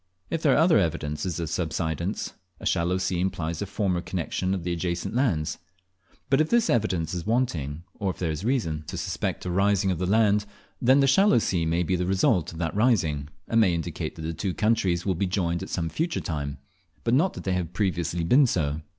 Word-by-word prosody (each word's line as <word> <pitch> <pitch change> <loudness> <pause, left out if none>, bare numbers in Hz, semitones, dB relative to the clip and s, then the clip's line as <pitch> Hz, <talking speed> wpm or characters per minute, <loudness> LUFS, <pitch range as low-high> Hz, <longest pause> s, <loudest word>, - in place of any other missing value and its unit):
If 165 - -1
there 145 -5 +4
are - - +3
other 160 - +5
evidences 80 -1 -2
of 85 - -2
subsidence, 85 +2 -2 0.3
a - - -9
shallow 90 +1 +1
sea 95 -1 -1
implies 85 -3 -2
a 100 - -2
former 95 -3 -1
connexion 90 +2 -2
of 90 - -5
the 90 0 -1
adjacent 85 0 -2
lands; 110 - 0 0.7
but 135 +2 +3
if 155 - 0
this 235 -1 +3
evidence 95 -8 0
is 85 0 -4
wanting, 85 - -1 0.2
or 100 - 0
if 90 - -4
there 85 -3 -1
is 80 +4 -4
reason 105 - 0
to - - -5
suspect - - -3
a 90 - -2
rising 100 +1 +2
of 90 - -2
the 90 - -1
land, 105 0 +3 0.3
then 130 +3 +5
the - - +5
shallow 195 +5 +5
sea 90 -7 +1
may 85 +2 +1
be 90 +2 0
the 90 0 -1
result 95 -3 +2
of 80 - -10
that 80 -1 -2
rising, 85 - +2 0.2
and 115 0 +3
may 90 -5 +3
indicate 80 - -4
that 80 - -8
the 80 +1 -3
two 95 +2 -3
countries 95 -6 +1
will 95 - +2
be 95 +3 -1
joined 85 -2 -1
at - - -6
some 85 -3 -1
future 165 - -1
time, 70 -3 -4 0.5
but 115 - +1
not 165 +9 +3
that - - -8
they 95 - 0
have 90 -3 -2
previously 90 -4 -1
been 130 - +5
so. 75 -7 -1
90 Hz, 220 wpm, -26 LUFS, 85-105 Hz, 0.7 s, other